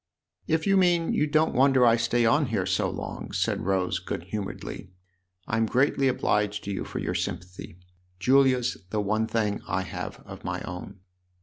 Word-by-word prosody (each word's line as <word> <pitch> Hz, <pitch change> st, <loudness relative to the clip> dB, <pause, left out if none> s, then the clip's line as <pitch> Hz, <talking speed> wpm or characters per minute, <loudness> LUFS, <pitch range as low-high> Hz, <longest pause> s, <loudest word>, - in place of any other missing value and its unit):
" -, -, -43 dB
If 160 Hz, -, -8 dB
you 195 Hz, 0 st, +4 dB
mean 175 Hz, -3 st, +3 dB
you 150 Hz, -, +2 dB
don't 155 Hz, +2 st, +2 dB
wonder 130 Hz, 0 st, +5 dB
I 115 Hz, -1 st, +6 dB
stay 115 Hz, +1 st, +1 dB
on 145 Hz, +5 st, +3 dB
here 105 Hz, -5 st, -1 dB
so 95 Hz, -1 st, +1 dB
long," -, -, -6 dB
said -, -, -1 dB
Rose 95 Hz, -2 st, +1 dB
good 85 Hz, -, -5 dB
humouredly, 95 Hz, -1 st, -6 dB, 0.3 s
" 90 Hz, 0 st, -45 dB
I'm 110 Hz, +1 st, +1 dB
greatly 135 Hz, +3 st, +2 dB
obliged 105 Hz, -5 st, 0 dB
to 100 Hz, -, -4 dB
you 95 Hz, -, -3 dB
for -, -, -7 dB
your -, -, -2 dB
sympathy. 90 Hz, -1 st, -5 dB, 0.4 s
Julia's 130 Hz, +3 st, +3 dB
the 105 Hz, -, -1 dB
one 110 Hz, +2 st, 0 dB
thing 105 Hz, -3 st, -1 dB
I 95 Hz, +2 st, -1 dB
have 90 Hz, -, -6 dB
of -, -, -10 dB
my -, -, -3 dB
own." 90 Hz, +1 st, -8 dB
110 Hz, 185 wpm, -26 LUFS, 95-135 Hz, 0.4 s, I